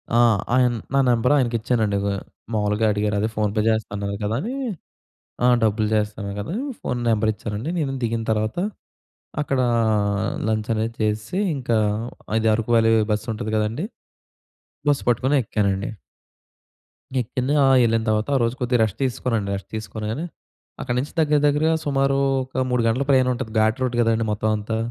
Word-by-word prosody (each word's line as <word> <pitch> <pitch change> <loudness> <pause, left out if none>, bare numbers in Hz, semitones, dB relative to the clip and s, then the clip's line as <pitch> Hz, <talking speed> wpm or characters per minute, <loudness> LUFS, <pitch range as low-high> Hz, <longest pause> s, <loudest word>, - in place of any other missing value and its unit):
ఆ! - - +5 0.4
ఆయన 125 -1 +4 0.2
నా 140 - +4
నెంబర్ 120 +4 +3
ఆయనకి 120 -3 +1
ఇచ్చానండి. 110 -4 0
గొ 100 - +1 0.4
మామూలుగా 105 +1 +1
అడిగారు. 105 0 0
అదే 110 +2 0
ఫోన్ 105 -1 0
పే 105 - +2
చేస్తా 110 0 0
అన్నారు 100 0 -3
కదా! 105 +2 0
అని. 235 +7 -4 0.9
ఆ! - - +6 0.2
డబ్బులు 110 0 +2
చేస్తా 105 0 0
అన్నారు 100 0 -5
కదా! 160 - -5 0.3
ఫోన్ 125 -1 -2
నెంబర్ 110 0 +2
ఇచ్చానండి. 105 +9 -4
నేను 135 -3 -1
దిగిన 115 0 -1
తర్వాత, 110 +5 -1 0.9
అక్కడ 135 -2 -1 0.9
లంచ్ 110 0 -1
అనేది 110 +1 -1
చేసేసి 110 - -1 0.2
ఇంకా, 120 -4 0 0.6
అది 110 0 +1
అరకు 115 +1 -2
వ్యాలీ 115 0 +4 0.2
బస్సు 105 +3 -2
ఉంటది 110 +1 -4
కదండీ! 110 - -1 1.0
బస్ 145 - +2
పట్టుకొని 130 +5 +2
ఎక్కానండి. 100 0 -1 1.3
ఎక్కింది. 130 +4 -2
ఆ! - - +5 0.2
వెళ్ళిన 115 -1 +2
తర్వాత 110 +2 +1
ఆ - - +5
రోజు 115 +2 0
కొద్దిగా 125 -1 +1
రెస్ట్ 105 -4 -2
తీసుకున్నానండి. 115 -5 -1
రెస్ట్ 95 - -11
తీసుకోగానే, 110 +7 -4 0.6
అక్కడి 125 -1 -2
నుంచి 140 - -4
దగ్గర 150 -1 +3
దగ్గరగా 155 +3 +2
సుమారు 135 -1 +2 0.3
ఒక 130 0 -2
3 125 -1 +2
గంటల 125 +5 +1
ప్రయాణం 130 -1 +4
ఉంటది. 110 -2 -5
ఘాట్ 110 +3 +2
రోడ్ 125 -1 -1
కదండీ! 115 0 +2
మొత్తం 110 +1 0
అంతా. 110 +2 -3
115 Hz, 160 wpm, -23 LUFS, 105-130 Hz, 1.3 s, ఆ